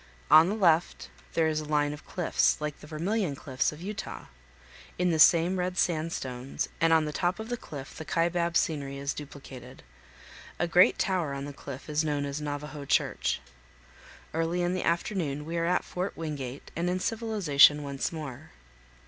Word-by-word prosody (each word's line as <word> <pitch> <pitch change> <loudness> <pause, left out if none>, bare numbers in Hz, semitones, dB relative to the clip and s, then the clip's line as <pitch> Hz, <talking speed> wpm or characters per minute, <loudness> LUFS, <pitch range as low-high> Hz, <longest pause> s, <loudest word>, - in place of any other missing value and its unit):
On 155 +3 +8
the 205 - -1
left 175 -5 +2 0.2
there 165 - +2
is 155 -1 0
a 155 - -5
line 150 -1 +1
of 150 - -11
cliffs, 175 -3 +1
like 150 -1 -4
the - - -12
Vermilion 170 +1 -1
Cliffs 135 -2 -1
of 155 +3 -10
Utah. 210 +2 -6 0.7
In 180 0 +2
the 160 - 0
same 175 +3 +6
red 180 0 -2
sandstones 145 -7 -2
and 165 0 +3
on 160 -1 +5
the 150 - -4
top 180 +5 0
of 220 +1 -6
the 245 - -1
cliff 140 - -9
the 160 - -6
Kaibab 170 +1 +1
scenery 140 -3 -1
is 140 0 -2
duplicated. 135 -3 -10 0.7
A 175 - 0
great 175 +2 +5
tower 175 -7 0
on 140 0 -5
the 145 - -7
cliff 140 -1 -9
is 150 0 +1
known 145 -2 -1
as 140 +2 -4
"Navajo 150 0 -5
Church." 140 - 0 0.9
Early 165 +2 0
in 175 +1 0
the 185 - -1
afternoon 170 -4 -1
we 165 +2 -4
are 165 - +1
at 180 +1 +1
Fort 180 +2 -4
Wingate 145 -5 -5
and 170 +2 0
in 180 +1 0
civilization 185 -10 +4
once 140 -1 -3
more. 150 -3 -7
155 Hz, 180 wpm, -28 LUFS, 145-175 Hz, 0.9 s, On